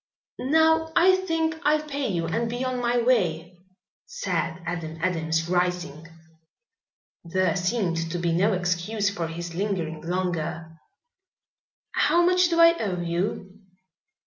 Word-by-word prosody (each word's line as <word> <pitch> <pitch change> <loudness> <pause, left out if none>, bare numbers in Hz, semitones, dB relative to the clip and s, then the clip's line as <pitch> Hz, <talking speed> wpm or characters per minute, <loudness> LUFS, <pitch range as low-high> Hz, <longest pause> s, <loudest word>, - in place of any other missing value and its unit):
"Now 320 +3 +3
I 370 +2 +6
think 325 -4 -1
I'll 305 +1 +2
pay 285 -2 -3
you 170 -5 -1
and 225 +8 -1
be 245 +2 -3
on 255 -1 -2
my 240 0 +1
way," 175 -8 0 0.5
said 475 - -3
Adam 165 -1 -4
Adams, 165 -2 -1
rising. 175 -3 -1 1.2
There 185 +2 0
seemed 180 -4 -1
to 175 - -2
be 170 -1 0
no 195 +6 +2
excuse 185 +3 -1
for 175 -5 -3
his 170 +1 -6
lingering 170 -5 -3
longer. 170 -2 -3 1.2
"How 345 - +3
much 360 0 +4
do 335 -1 +1
I 335 0 +7
owe 185 -4 -2
you?" 185 +3 -3
185 Hz, 130 wpm, -25 LUFS, 170-260 Hz, 1.2 s, I